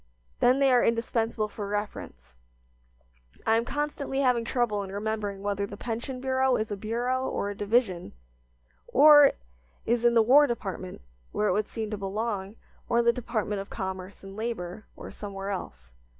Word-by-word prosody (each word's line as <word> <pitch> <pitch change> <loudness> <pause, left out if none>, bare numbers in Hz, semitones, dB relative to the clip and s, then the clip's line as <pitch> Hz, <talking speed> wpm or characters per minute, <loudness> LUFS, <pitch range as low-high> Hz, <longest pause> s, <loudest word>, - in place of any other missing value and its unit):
Then 250 +2 +4
they 275 -1 +4
are 245 -1 +5
indispensable 230 -1 0
for 205 -1 -6
reference. 200 - -5 1.1
I 225 - +4
am 230 +1 +1
constantly 285 -1 -2
having 250 -3 +2
trouble 230 -3 0
in 195 -1 -6
remembering 205 -1 -3
whether 200 0 -1
the 200 - -9
pension 240 +3 -4
bureau 260 0 +2
is 215 -1 -2
a - - -1
bureau 240 +5 -1
or 200 - -2
a - - -7
division, 205 -4 0 0.7
or 290 -1 +8 0.5
is 235 0 +1
in 240 0 +4
the 225 - +6
War 285 +6 +6
Department, 190 -6 -5 0.3
where 210 - 0
it - - +2
would 210 0 0
seem 220 -2 -4
to 210 - -2
belong, 200 0 -3 0.3
or 235 - +2
in 235 - +3
the 235 - +5
Department 215 -4 -2
of 195 - -10
Commerce 190 -1 -6
and 195 0 -10
Labor, 215 -3 -5
or - - -9
somewhere 200 -1 -6
else. 60 - -7
220 Hz, 170 wpm, -27 LUFS, 200-240 Hz, 1.1 s, or